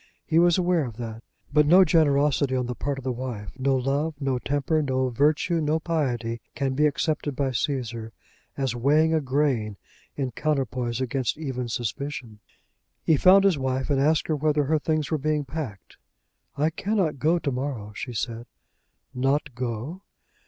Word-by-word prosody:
He 165 0 +3
was 175 0 +5
aware 180 -3 +2
of 115 -3 -8
that. 115 -2 -6 0.3
But 150 0 +5
no 185 +4 +7
generosity 145 -4 +3
on 125 -1 0
the 125 - -3
part 140 +2 -3
of 135 - -7
the 130 - -1
wife, 120 -5 -5
no 135 +1 +2
love, 140 +5 0
no 135 -3 0
temper, 145 +4 0
no 130 -2 0
virtue, 150 +6 +2
no 155 +1 +1
piety 125 -9 -2
can 135 -1 -1
be 150 +3 +3
accepted 150 -1 -1
by 135 0 0
Cæsar 120 -4 -2 0.5
as 135 -3 -1
weighing 150 +6 +3
a 160 - +2
grain 130 -7 0 0.4
in 135 -3 -2
counterpoise 130 -5 -1
against 130 +1 -1
even 130 -5 -4
suspicion. 120 0 -4 0.6
He 160 - +4
found 190 +6 +6
his 190 -7 +3
wife 130 +1 -1
and 135 -1 +2
asked 155 +2 +2
her 155 - +1
whether 150 0 +1
her 155 +3 +1
things 155 -2 -1
were 155 - +1
being 150 0 0
packed. 130 - -7 0.6
"I 155 +3 +2
cannot 185 -5 -1
go 160 +5 +3
to 150 -4 -2
morrow," 125 -5 -4
she 125 - -5
said. 115 +1 -4 0.7
"Not 135 +2 0
go?" 125 - -4
140 Hz, 170 wpm, -25 LUFS, 125-155 Hz, 0.7 s, no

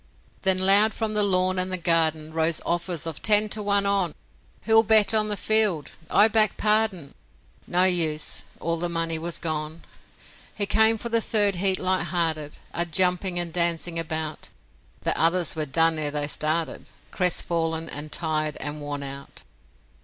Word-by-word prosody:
Then 190 -1 +3
loud 200 +3 +4
from 220 -1 -2
the 210 - +2
lawn 185 -2 +1
and 185 +1 0
the 185 - 0
garden 160 -2 +1
Rose 160 0 0
offers 170 -1 -2
of 165 -3 -6
'Ten 210 0 +4
to 215 - -1
one 200 -1 +2
ON!' 195 -5 0 0.5
'Who'll 225 0 +5
bet 220 -1 +4
on 215 -1 +2
the 210 -1 -2
field? 210 -6 +2 0.2
I 210 - +5
back 215 -2 +2
Pardon!' 210 -8 0 0.5
No 180 +1 +1
use; 165 -5 0 0.2
all 170 +1 -2
the 175 +1 -3
money 165 -1 -2
was 170 +1 -1
gone. 155 0 -4 0.7
He 205 - -1
came 220 +2 +3
for 235 +2 -5
the 230 0 +1
third 205 -4 +1
heat 190 +1 +3
light 185 -1 0
hearted, 160 -3 -2 0.2
A 170 - 0
jumping 180 +2 +1
and 175 -2 -3
dancing 170 -1 -1
about; 155 -1 -5 0.5
The - - +1
others 170 +1 +1
were 155 -1 -3
done 165 +3 +2
ere 150 -1 -1
they 145 0 -2
started 155 +2 -3 0.2
Crestfallen, 165 -3 -1
and 150 0 -7
tired, 155 -2 -2
and 150 +1 -5
worn 145 -1 -5
out. 140 0 -9
175 Hz, 170 wpm, -23 LUFS, 160-200 Hz, 0.7 s, Who'll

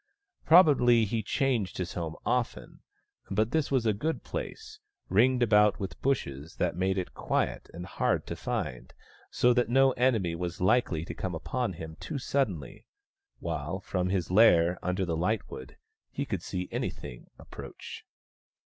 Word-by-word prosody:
Probably 135 -9 +6
he 110 +2 -1
changed 115 -3 -1
his 90 -2 -3
home 80 -3 -4
often; - - -2 0.5
but 110 +4 +1
this 155 0 +1
was 130 -4 +1
a 110 - +3
good 155 +11 -2
place, 435 -1 -6 0.3
ringed 125 +5 +4
about 105 -2 +4
with 95 -5 -6
bushes 80 - -2
that 85 -2 -1
made 95 +2 0
it 90 - -3
quiet - - -2
and 90 +1 -7
hard - - 0
to - - -5
find, 60 0 -4 0.3
so 125 0 +3
that 120 0 +1
no 135 +2 +5
enemy 115 -10 +1
was 85 0 -4
likely 90 -5 +2
to - - -6
come 95 -3 -4
upon 115 +6 -2
him 80 -1 -8
too 155 - -5
suddenly; 125 - -2 0.5
while, 80 +4 -4
from 90 -1 -2
his 90 -3 -1
lair 90 -4 +5
under 90 +2 -1
the 85 -2 -1
lightwood, 90 - -3 0.3
he - - -3
could - - -3
see 90 -1 -4
anything - - -5
approach. - - -10
95 Hz, 155 wpm, -29 LUFS, 85-125 Hz, 0.5 s, Probably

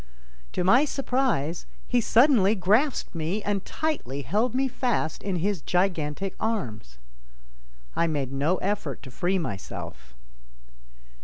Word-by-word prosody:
To - - 0
my 240 +10 +6
surprise, 255 - 0 0.2
he 245 -1 +2
suddenly 225 -4 +5
grasped 215 - +2
me 170 +6 -2
and 205 -2 -1
tightly 145 - -3
held 215 - 0
me 265 +1 +2
fast 240 - -1
in 195 -2 -2
his 185 0 -1
gigantic 180 0 0
arms. 115 - -3 1.0
I 170 - +2
made 145 -5 -2
no 150 +7 +1
effort 190 - -2
to 130 - -10
free 180 +8 0
myself. 95 - -6
190 Hz, 125 wpm, -26 LUFS, 150-225 Hz, 1.0 s, my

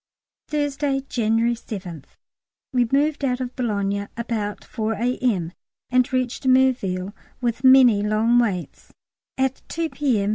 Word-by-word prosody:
Thursday, 290 -2 -1
January 230 0 +1
7th. 185 - -8 0.7
We 245 -2 +2
moved 290 +2 +1
out 250 -2 0
of 250 -1 -5
Boulogne 200 -4 -1
about 220 -3 -3
4 220 -2 -2
A.M., 220 -6 -1 0.4
and 255 +2 +2
reached 255 0 -1
Merville 220 -8 +2 0.3
(with 240 0 -2
many 260 -5 +7
long 215 +3 +2
waits) 195 -7 -2 0.5
at 265 0 0
2 330 -1 -2
P.M. 235 -9 0
240 Hz, 120 wpm, -23 LUFS, 210-260 Hz, 0.7 s, many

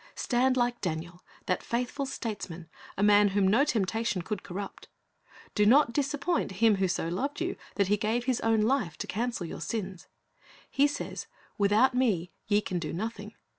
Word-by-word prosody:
Stand 255 +1 +1
like 240 -1 0
Daniel, 175 0 -4 0.2
that 185 - 0
faithful 250 +4 -2
statesman, 195 -10 -5 0.3
a 195 - +1
man 205 0 +6
whom 195 -1 +2
no 220 +8 +4
temptation 220 - 0
could 210 0 -4
corrupt. 195 +2 -7 0.7
Do 210 - +3
not 235 +3 +5
disappoint 290 - 0
Him 215 +2 +4
who 190 0 +2
so 175 -2 -1
loved 260 +13 -2
you 355 +2 -2 0.2
that 200 - +2
He 210 +2 +3
gave 225 +4 -1
His 255 -2 0
own 225 -1 +3
life 215 - +1
to - - -4
cancel 230 -3 -2
your 165 - -7
sins. 190 0 -4 0.6
He 280 +1 +4
says, 290 - -5 0.3
"Without 210 +6 +4
Me 210 -9 +1 0.2
ye 205 0 +3
can 180 -3 -3
do 155 -3 -4
nothing." 210 +3 -5
215 Hz, 170 wpm, -29 LUFS, 190-245 Hz, 0.7 s, man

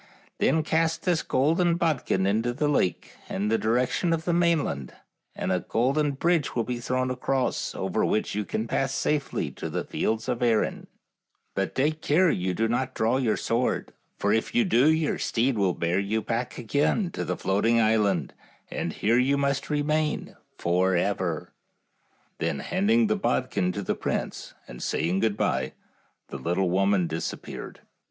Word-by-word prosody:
Then 160 -1 +3
cast 160 +1 0
this 175 -3 +2
golden 165 +6 +2
bod 165 -6 0
kin 95 0 +1
into 110 +5 +1
the 145 +4 0
lake 115 - 0 0.2
in 100 +2 -1
the 115 - +3
direction 125 +9 +1
of 160 0 -2
the 175 - +1
main 170 -3 +3
land, 70 -3 -5 0.4
and 95 - -2
a 90 - +2
golden 140 - +1
bridge 165 +2 +1
will 120 - +1
be 120 +1 -3
thrown 130 +1 -1
across, 130 0 -1
over - - -1
which 110 - 0
you 105 +1 -1
can 110 +3 -3
pass 135 +3 0
safely 150 0 -1
to - - -6
the - - -2
fields 110 +2 -2
of 125 -2 -1
Erin; 115 -3 +1 0.7
but 95 -3 -2
take 155 +4 +1
care 170 +5 +4
and 90 - -1
do 115 - +2
not 130 +3 -1
draw 115 +3 +2
your 120 -5 +1
sword, 120 +2 -1 0.2
for 100 +1 +1
if 110 - -1
you 240 -2 +4
do 145 -3 +4
your 160 -1 0
steed 125 +3 +1
will 95 -4 +1
bear 85 +2 0
you 105 +2 -1
back 120 +2 -3
again 145 - 0
to - - -3
the - - -2
Floating 110 +4 +2
Island, 110 -2 +2 0.4
and - - -3
here 115 +3 +2
you 135 +3 +2
must 140 0 0
re 150 -1 +1
main 155 0 -1 0.2
forever." 90 -1 0 0.9
Then - - -1
handing 215 - +2
the 215 0 +1
bodkin 130 - 0
to 100 - -4
the - - 0
prince, - - -4
and - - -10
saying 85 +4 0
good 110 -1 +1
by, 65 0 0 0.6
the - - -5
little 90 +5 0
woman 95 0 +3
dis 80 0 -2
appeared. - - -9
120 Hz, 175 wpm, -26 LUFS, 100-150 Hz, 0.9 s, care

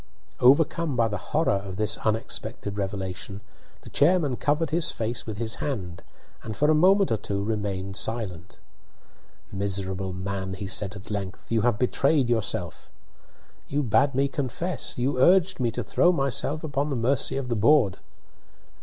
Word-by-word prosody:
Overcome 145 +3 +4
by 115 -1 +3
the 105 -2 -6
horror 160 +2 +2
of 95 -2 -7
this 110 +2 0
unexpected 110 -2 -3
revelation, 95 -1 -4 0.4
the - - -13
chairman 150 -3 +3
covered 150 +4 0
his 170 +1 +2
face 115 +1 -3
with 110 -2 -5
his 110 0 -3
hand 95 - -4 0.4
and 110 -2 -6
for 150 +1 +3
a - - +5
moment 190 +5 +4
or 110 - +2
two 100 -1 -3
remained 100 -3 -3
silent. 95 -6 -2 0.9
"Miserable 95 -1 -2
man," 95 0 -4
he 100 - -6
said 100 +1 -1
at 100 +1 -9
length, 100 0 -5
"you 115 -1 +2
have 120 -2 +2
betrayed 130 +2 +2
yourself." 100 -7 -2 0.8
"You 145 +1 -1
bade 125 +4 +2
me 140 +1 +2
confess! 145 +4 -3
You 125 +2 0
urged 185 +4 +4
me 120 -2 +1
to 115 - -4
throw 175 - +3
myself 140 0 -1
upon 145 -1 -1
the 140 - -1
mercy 130 +3 0
of 135 -2 -3
the 120 - 0
board!" 115 -2 +4
115 Hz, 160 wpm, -26 LUFS, 100-140 Hz, 0.9 s, a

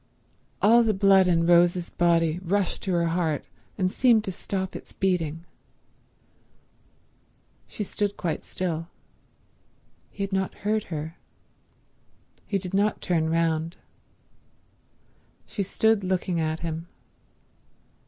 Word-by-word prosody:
All 230 +3 +7
the 220 -3 +2
blood 195 -1 +5
in 165 -2 +3
Rose's 175 0 +4
body 170 -1 +2
rushed 190 +1 0
to 190 - -2
her 170 -1 +2
heart 165 -4 -1 0.3
and 185 -2 +1
seemed 235 -3 +4
to 190 - -3
stop 190 +1 -4
its - - -9
beating. 165 -4 -1 2.2
She 210 - -4
stood 205 0 -2
quite 165 -3 -2
still. 165 -3 -3 1.2
He 200 - -5
had 195 0 -4
not 190 -1 -1
heard 215 0 +1
her. 160 +1 -6 1.3
He 200 - 0
did 185 -1 -6
not 205 +2 +2
turn 160 -3 0
round. 165 0 0 1.7
She 205 - -4
stood 220 +2 +2
looking 185 -2 -1
at 160 0 -1
him. 165 0 -4
180 Hz, 115 wpm, -26 LUFS, 165-195 Hz, 2.2 s, All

